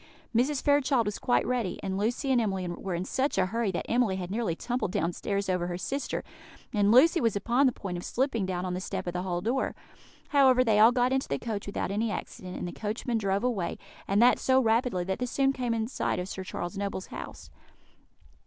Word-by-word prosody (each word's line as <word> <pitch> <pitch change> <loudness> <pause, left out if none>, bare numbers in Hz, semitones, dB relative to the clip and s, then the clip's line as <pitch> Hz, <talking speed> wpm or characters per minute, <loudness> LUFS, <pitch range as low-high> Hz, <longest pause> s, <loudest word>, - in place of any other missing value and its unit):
Mrs. 265 +4 +2
Fairchild 285 -4 +3
was 205 0 -3
quite 245 - +2
ready; 240 -7 -1
and 190 -1 -2
Lucy 235 +7 0
and 250 -2 +4
Emily 190 -4 -1
were 175 +1 -4
in 175 +2 -3
such 265 +7 -1
a 185 - +4
hurry 225 +2 -1
that 175 - -3
Emily 235 -5 +2
had 185 -1 -5
nearly 215 -6 -1
tumbled 245 -1 -2
downstairs 200 +2 -1
over 180 -2 0
her 175 0 -3
sister, 275 +9 -3 0.5
and 205 -1 +3
Lucy 325 +8 +6
was 230 -3 +2
upon 240 +7 +3
the - - +3
point 185 -6 -5
of - - -8
slipping 235 -6 -1
down 180 -1 -2
on 180 - -2
the 180 - -3
step - - -4
of 175 - -3
the 180 - -2
hall 175 -1 -2
door; 240 +7 -1 0.5
however, 260 -3 +5
they 220 -3 +3
all 225 +2 +8
got 250 +1 +2
into 265 0 0
the 140 - -1
coach 205 +4 -4
without 200 - -2
any 220 +3 0
accident, 185 -3 -6
and - - -4
the - - -5
coachman 225 +4 -2
drove 195 0 0
away, 225 -9 -1 0.3
and 200 +1 +2
that 245 - +5
so 260 0 +3
rapidly 225 -5 +2
that 190 +1 -3
they 250 - -1
soon 270 +2 +2
came 250 -3 -2
in 220 -1 0
sight 260 - -1
of 180 - -3
Sir 190 -1 -5
Charles 185 +1 -5
Noble's 200 -2 -3
house. - - -8
215 Hz, 225 wpm, -28 LUFS, 185-250 Hz, 0.5 s, all